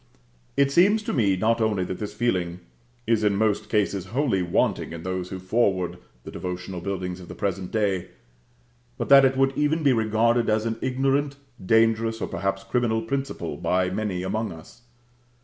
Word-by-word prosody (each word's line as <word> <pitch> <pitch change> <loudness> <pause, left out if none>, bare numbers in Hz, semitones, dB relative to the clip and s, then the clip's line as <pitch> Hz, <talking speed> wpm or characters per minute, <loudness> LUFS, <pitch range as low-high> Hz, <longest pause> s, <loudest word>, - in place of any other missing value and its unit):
It 140 0 +3
seems 200 +8 +4
to - - -3
me, 100 -8 +2
not 115 +4 +1
only 105 -4 +1
that 90 0 -5
this 105 - -4
feeling 90 -7 -1 0.4
is 115 -1 +2
in 105 -1 +3
most 105 0 0
cases 100 -3 0
wholly 120 -3 0
wanting 85 -1 0
in 85 -1 -7
those 95 -1 -3
who 95 - -5
forward 95 -3 0 0.2
the - - -9
devotional 90 0 -5
buildings 90 -1 -4
of 90 - -11
the 90 - -9
present 95 0 -3
day; 100 -4 0 0.9
but - - -3
that 140 -1 +8
it 130 0 +2
would 135 0 +2
even 150 +2 +1
be 140 -3 +5
regarded 115 +1 +2
as 110 +1 +1
an 115 0 -2
ignorant, 135 +2 0 0.3
dangerous, 115 +2 +2
or - - -2
perhaps 95 0 -2
criminal 110 +2 0
principle 135 +4 -3
by 90 0 0
many 95 -2 -2
among 110 +4 -2
us. 80 +8 -13
110 Hz, 175 wpm, -25 LUFS, 95-120 Hz, 0.9 s, that